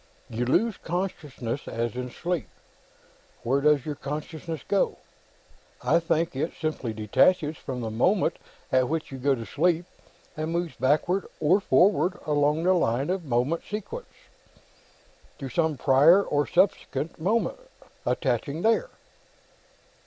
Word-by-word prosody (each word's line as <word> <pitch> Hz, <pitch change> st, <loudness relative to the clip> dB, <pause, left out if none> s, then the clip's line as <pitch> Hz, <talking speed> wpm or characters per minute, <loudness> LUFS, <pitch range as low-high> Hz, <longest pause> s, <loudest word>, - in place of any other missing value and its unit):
You 120 Hz, +2 st, -1 dB
'lose 205 Hz, -, +2 dB
consciousness' 150 Hz, -8 st, -4 dB
as 115 Hz, 0 st, -2 dB
in 125 Hz, 0 st, -4 dB
sleep; 175 Hz, -, -3 dB, 0.9 s
where 135 Hz, +4 st, +1 dB
does 150 Hz, -2 st, +3 dB
your 150 Hz, -, -2 dB
consciousness 155 Hz, +3 st, -5 dB
go? 200 Hz, -, +1 dB, 0.9 s
I 165 Hz, -, +4 dB
think 165 Hz, -2 st, 0 dB
it 155 Hz, +5 st, -2 dB
simply 155 Hz, -7 st, -2 dB
detaches 150 Hz, -, +2 dB
from 130 Hz, -4 st, -6 dB
the 110 Hz, -1 st, -3 dB
moment 175 Hz, -, +2 dB, 0.3 s
at 130 Hz, -1 st, +3 dB
which 160 Hz, -1 st, -2 dB
you 135 Hz, -, -6 dB
go 135 Hz, +1 st, +2 dB
to 115 Hz, -2 st, -7 dB
sleep, 170 Hz, +5 st, +1 dB, 0.5 s
and 155 Hz, +1 st, -3 dB
moves 170 Hz, -1 st, -2 dB
backward 165 Hz, +8 st, +1 dB
or 160 Hz, +6 st, +4 dB
forward 180 Hz, +1 st, +3 dB
along 150 Hz, +1 st, +2 dB
the 185 Hz, +1 st, +4 dB
line 135 Hz, -2 st, +1 dB
of 185 Hz, -3 st, -2 dB
moment 130 Hz, +6 st, 0 dB
sequence, 215 Hz, -, -6 dB, 1.3 s
to 135 Hz, -3 st, -6 dB
some 160 Hz, +2 st, 0 dB
prior 145 Hz, +10 st, +6 dB
or 145 Hz, -4 st, 0 dB
subsequent 170 Hz, -5 st, 0 dB
moment, 225 Hz, -, 0 dB, 0.4 s
attaching 140 Hz, +4 st, -1 dB
there." 230 Hz, -, +2 dB
155 Hz, 130 wpm, -26 LUFS, 135-175 Hz, 1.3 s, prior